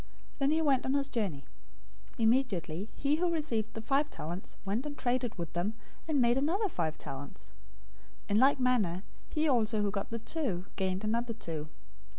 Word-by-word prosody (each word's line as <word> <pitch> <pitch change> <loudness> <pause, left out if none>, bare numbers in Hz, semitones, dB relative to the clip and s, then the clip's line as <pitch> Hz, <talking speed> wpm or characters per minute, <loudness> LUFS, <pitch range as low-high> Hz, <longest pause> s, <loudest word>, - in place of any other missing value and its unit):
Then 275 0 +3
he 320 +2 +3
went 275 -4 +3
on 265 - +1
his 280 0 +2
journey. 190 - -2 0.7
025:016 230 - -1
Immediately 220 -6 +2
he 290 +2 +2
who 350 +1 +2
received 235 -10 0
the 225 - -5
five 280 +5 +2
talents 175 - -6
went 205 +6 0
and 290 - -6
traded 245 -2 0
with 170 -2 -4
them, 180 +6 -1 0.3
and 305 -3 +2
made 240 0 +4
another 380 +9 +1
five 160 - -1
talents. 135 +1 -8 0.7
025:017 - - -7
In 205 - +5
like 270 +2 +5
manner 210 -8 +2 0.3
he 310 +1 +1
also 225 -5 +3
who 200 - +1
got 200 -1 -3
the 230 - -2
two 230 - -2
gained 190 0 -1
another 230 +2 0
two. 155 -7 -5
230 Hz, 180 wpm, -32 LUFS, 190-275 Hz, 0.7 s, In